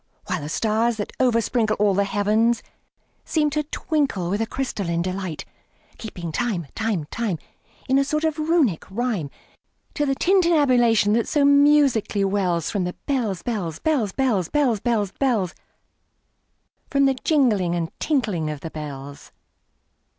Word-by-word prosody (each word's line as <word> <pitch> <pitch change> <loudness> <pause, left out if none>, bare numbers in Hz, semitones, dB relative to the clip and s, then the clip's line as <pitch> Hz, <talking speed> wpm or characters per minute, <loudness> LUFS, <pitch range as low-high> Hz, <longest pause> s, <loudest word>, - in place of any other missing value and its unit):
While 180 - -2
the 145 - -6
stars, 225 +6 +1
that 205 - -5
oversprinkleAll 225 -4 +2
the 200 +1 +2
heavens, 215 +4 +1 0.6
seem 300 -2 0
to 305 +1 0
twinkleWith 215 - -1
a 225 - -1
crystalline 195 -10 -2
delight; 185 -3 -4 0.5
Keeping 175 -7 -6
time, 200 -4 -1
time, 215 -9 -1
time, 225 -7 -2 0.5
In 265 +1 +3
a - - +3
sort 305 +3 -1
of 315 -1 0
Runic 305 - +2
rhyme, 210 - -2 0.6
To 295 -1 -1
the 270 - +1
tintinnabulation 265 - +3
that 230 0 +1
so 290 -2 +2
musically 280 -8 +4
wellsFrom 190 -1 0
the 180 - -3
bells, 235 - -1
bells, 185 -10 -3
bells, 270 -11 0
bells, 215 - 0
Bells, 265 -8 +1
bells, 215 -4 0
bells—From 250 +4 -4
the 270 - +4
jingling 235 - +1
and 165 -1 -2
the - - -39
tinkling 210 - 0
of 150 -2 -5
the 165 - -6
bells. 145 -2 -8
220 Hz, 135 wpm, -23 LUFS, 185-270 Hz, 0.6 s, musically